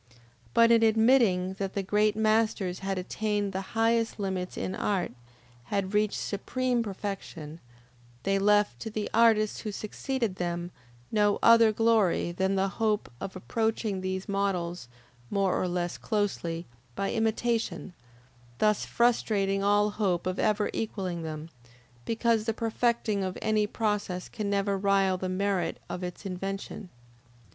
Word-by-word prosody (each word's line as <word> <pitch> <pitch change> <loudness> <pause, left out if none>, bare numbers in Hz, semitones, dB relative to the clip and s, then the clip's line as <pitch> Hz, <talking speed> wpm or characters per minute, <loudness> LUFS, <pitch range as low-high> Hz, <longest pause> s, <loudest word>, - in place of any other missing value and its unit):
But 230 0 +6
in 230 -1 +6
admitting 220 -5 +4
that 195 -1 -3
the 200 - 0
great 210 +2 +2
masters 215 -4 +1
had 195 0 -2
attained 205 +2 -2
the 190 - -2 0.2
highest 225 0 +2
limits 190 -2 -3
in 185 - -2
art, 195 -2 -1 0.5
had 200 -1 -2
reached 210 0 +2
supreme 245 +4 -1
perfection, 195 -6 -6 0.6
they 195 0 +1
left 205 +1 +3
to 225 - -5
the 215 -1 -4
artists 220 -2 +4
who 215 - -4
succeeded 220 0 -3
them 175 0 -3 0.4
no 210 -2 +3
other 230 -1 +7
glory 215 -6 +2
than 190 +2 0
the 195 0 +2
hope 215 +1 -1
of 190 - -5
approaching 220 0 -1
these 185 0 -3
models, 180 -6 -1 0.4
more 195 -2 +1
or 185 - 0
less 175 0 -2
closely, 175 -5 -2 0.3
by 195 - -1
imitation, 225 -3 -1 0.6
thus 210 +6 +2
frustrating 205 -5 +1
all 205 +1 +3
hope 190 -5 0
of 185 +1 -2
ever 210 0 +1
equalling 190 -6 -3
them, 155 -1 -5 0.6
because 230 -1 +1
the 225 -1 -1
perfecting 225 -3 0
of 185 -1 -3
any 215 -1 +1
process 205 -4 -2
can 210 -3 -3
never 200 0 0
rival 195 -1 +2
the 185 - -2
merit 185 -2 0
of 180 - -4
its 180 +3 -6
invention. 195 +1 -5
200 Hz, 140 wpm, -28 LUFS, 185-220 Hz, 0.6 s, other